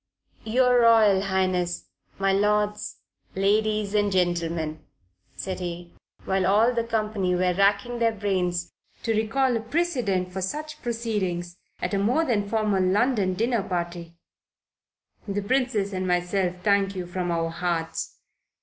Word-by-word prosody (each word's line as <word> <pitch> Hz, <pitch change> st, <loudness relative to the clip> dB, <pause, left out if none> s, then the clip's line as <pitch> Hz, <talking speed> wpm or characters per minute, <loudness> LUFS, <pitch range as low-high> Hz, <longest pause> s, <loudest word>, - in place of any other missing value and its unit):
"Your 250 Hz, +2 st, +4 dB
Royal 220 Hz, -4 st, +5 dB
Highness, 185 Hz, -2 st, 0 dB, 0.3 s
my 195 Hz, 0 st, +2 dB
lords, 210 Hz, +1 st, 0 dB, 0.3 s
ladies 210 Hz, +1 st, +1 dB
and 205 Hz, -1 st, +2 dB
gentlemen," 170 Hz, -4 st, 0 dB, 0.6 s
said 185 Hz, -1 st, -4 dB
he, 175 Hz, -1 st, -6 dB, 0.3 s
while 190 Hz, -1 st, +1 dB
all 220 Hz, +5 st, +4 dB
the 235 Hz, -1 st, 0 dB
company 215 Hz, -5 st, -1 dB
were 180 Hz, 0 st, +2 dB
racking 200 Hz, +5 st, +1 dB
their 230 Hz, -1 st, +3 dB
brains 185 Hz, -4 st, -1 dB, 0.3 s
to 225 Hz, -, +1 dB
recall 240 Hz, +4 st, +1 dB
a -, -, +1 dB
precedent 230 Hz, -, -1 dB
for 190 Hz, -, -3 dB
such 305 Hz, +11 st, -4 dB
proceedings 200 Hz, -7 st, -2 dB, 0.3 s
at -, -, -1 dB
a 200 Hz, -, +2 dB
more 250 Hz, +11 st, +2 dB
than 205 Hz, -7 st, 0 dB
formal 210 Hz, -3 st, +1 dB
London 200 Hz, 0 st, +2 dB
dinner 230 Hz, +2 st, +1 dB
party; 175 Hz, -2 st, -4 dB, 1.1 s
"the 200 Hz, 0 st, -2 dB
Princess 235 Hz, -4 st, 0 dB
and 185 Hz, 0 st, -2 dB
myself 180 Hz, +1 st, 0 dB
thank 200 Hz, -1 st, +2 dB
you 180 Hz, -1 st, -4 dB
from 175 Hz, 0 st, -3 dB
our 165 Hz, -1 st, -1 dB
hearts. 170 Hz, -1 st, -3 dB
200 Hz, 135 wpm, -25 LUFS, 180-220 Hz, 1.1 s, Royal